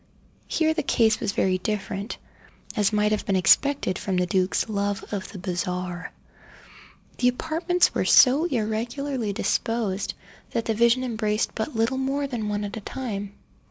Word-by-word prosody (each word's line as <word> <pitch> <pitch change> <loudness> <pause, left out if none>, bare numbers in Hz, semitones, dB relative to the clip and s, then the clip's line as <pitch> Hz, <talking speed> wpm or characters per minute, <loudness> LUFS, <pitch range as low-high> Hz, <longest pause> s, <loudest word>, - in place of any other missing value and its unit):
Here 315 -1 +2
the 315 - -1
case 225 -6 +2
was 200 - -2
very 185 -2 +1
different, 200 0 -3 0.6
as 210 -1 +2
might 210 0 +2
have 215 - 0
been 200 -4 0
expected 195 +3 +3
from 190 - -2
the 180 - +2
duke's 185 +3 +1
love 205 -2 -2
of 195 -2 -4
the 200 - -8
bizarre. 180 -1 -3 1.1
The 245 - +3
apartments 325 +7 +1
were - - 0
so 275 +5 +6
irregularly 240 -1 -2
disposed 200 0 -1 0.4
that 230 - -1
the 225 - +1
vision 235 +3 +3
embraced 220 -3 -1
but 230 +5 -4
little 230 +4 +1
more 275 +2 -1
than 235 -6 -3
one 205 0 -1
at 205 +1 -5
a - - -6
time. 205 -4 -5
215 Hz, 160 wpm, -25 LUFS, 200-250 Hz, 1.1 s, so